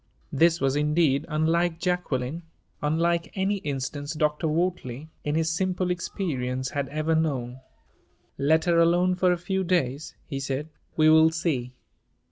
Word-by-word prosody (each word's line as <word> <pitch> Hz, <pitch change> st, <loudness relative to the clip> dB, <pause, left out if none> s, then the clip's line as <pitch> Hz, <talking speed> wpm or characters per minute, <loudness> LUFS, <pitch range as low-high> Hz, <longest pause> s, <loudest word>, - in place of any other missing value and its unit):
This 165 Hz, +3 st, +3 dB
was, 135 Hz, 0 st, +1 dB
indeed, 150 Hz, -1 st, +2 dB
unlike 165 Hz, +2 st, +1 dB
Jacqueline 165 Hz, -5 st, -1 dB, 0.4 s
unlike 165 Hz, +3 st, 0 dB
any 195 Hz, +1 st, 0 dB
instance 145 Hz, -1 st, -4 dB
Dr. 150 Hz, +1 st, 0 dB
Wortley, 155 Hz, -4 st, -2 dB
in 150 Hz, 0 st, -1 dB
his 160 Hz, 0 st, +1 dB
simple 185 Hz, +1 st, 0 dB
experience, 130 Hz, -8 st, -3 dB
had 140 Hz, -1 st, -2 dB
ever 155 Hz, +3 st, -1 dB
known. 130 Hz, -6 st, -1 dB, 0.8 s
"Let 160 Hz, +3 st, +3 dB
her 170 Hz, -1 st, +3 dB
alone 175 Hz, +2 st, +4 dB
for 180 Hz, 0 st, +2 dB
a 175 Hz, -, +1 dB
few 190 Hz, +2 st, -2 dB
days," 155 Hz, -5 st, -1 dB
he 135 Hz, -3 st, -4 dB
said. 135 Hz, +3 st, -3 dB, 0.3 s
"We 155 Hz, -1 st, +5 dB
will 160 Hz, 0 st, +7 dB
see." 145 Hz, -7 st, -2 dB
160 Hz, 140 wpm, -26 LUFS, 140-170 Hz, 0.8 s, will